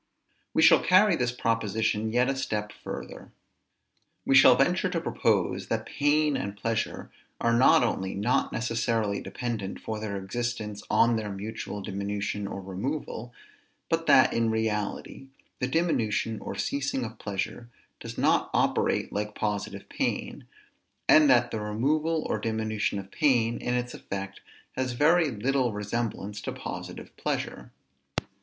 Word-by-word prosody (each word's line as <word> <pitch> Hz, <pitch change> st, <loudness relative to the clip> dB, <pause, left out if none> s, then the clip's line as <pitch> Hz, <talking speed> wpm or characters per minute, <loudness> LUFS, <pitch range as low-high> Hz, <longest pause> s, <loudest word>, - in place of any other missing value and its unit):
We -, -, +4 dB
shall -, -, +7 dB
carry 185 Hz, +1 st, +5 dB
this 125 Hz, -3 st, 0 dB
proposition 110 Hz, -2 st, 0 dB
yet 125 Hz, +2 st, +3 dB
a 135 Hz, -, 0 dB
step 105 Hz, -5 st, -2 dB
further. -, -, -8 dB, 0.9 s
We -, -, +2 dB
shall 135 Hz, -2 st, +8 dB
venture 180 Hz, +7 st, +2 dB
to 175 Hz, -2 st, -1 dB
propose, 105 Hz, -, 0 dB
that -, -, -2 dB
pain 150 Hz, 0 st, +2 dB
and 100 Hz, -3 st, -4 dB
pleasure 115 Hz, +2 st, -2 dB, 0.3 s
are 115 Hz, -, +2 dB
not 125 Hz, +1 st, +6 dB
only 95 Hz, -5 st, -1 dB
not 105 Hz, +6 st, +1 dB
necessarily 115 Hz, -3 st, -1 dB
dependent 115 Hz, -6 st, -4 dB
for 110 Hz, -1 st, -4 dB
their 105 Hz, -2 st, -3 dB
existence 105 Hz, +1 st, -4 dB
on 115 Hz, 0 st, +4 dB
their 110 Hz, -1 st, -3 dB
mutual 105 Hz, 0 st, -5 dB
diminution 100 Hz, +1 st, -3 dB
or 100 Hz, -, -6 dB
removal, 120 Hz, +4 st, -4 dB, 0.6 s
but -, -, 0 dB
that, -, -, +6 dB
in 115 Hz, -1 st, +1 dB
reality, 110 Hz, +4 st, -2 dB, 0.3 s
the 125 Hz, -, 0 dB
diminution 115 Hz, -, 0 dB
or -, -, -6 dB
ceasing 135 Hz, -2 st, -1 dB
of 110 Hz, -, -9 dB
pleasure 105 Hz, +4 st, -4 dB, 0.3 s
does -, -, -8 dB
not -, -, +2 dB
operate -, -, +1 dB
like 105 Hz, 0 st, -3 dB
positive 105 Hz, -1 st, -3 dB
pain; -, -, -3 dB, 0.6 s
and 155 Hz, -1 st, +7 dB
that 120 Hz, -1 st, +4 dB
the 110 Hz, -, -2 dB
removal 150 Hz, +10 st, 0 dB
or 110 Hz, -, -1 dB
diminution 110 Hz, -1 st, -1 dB
of 95 Hz, 0 st, -7 dB
pain, 120 Hz, -6 st, +2 dB
in 125 Hz, -, -1 dB
its 125 Hz, 0 st, -2 dB
effect, 100 Hz, 0 st, -6 dB, 0.3 s
has 130 Hz, -1 st, -2 dB
very 160 Hz, +5 st, +4 dB
little 125 Hz, +2 st, 0 dB
resemblance 105 Hz, -1 st, -3 dB
to -, -, -4 dB
positive -, -, -7 dB
pleasure. -, -, -3 dB
115 Hz, 140 wpm, -27 LUFS, 105-125 Hz, 0.9 s, shall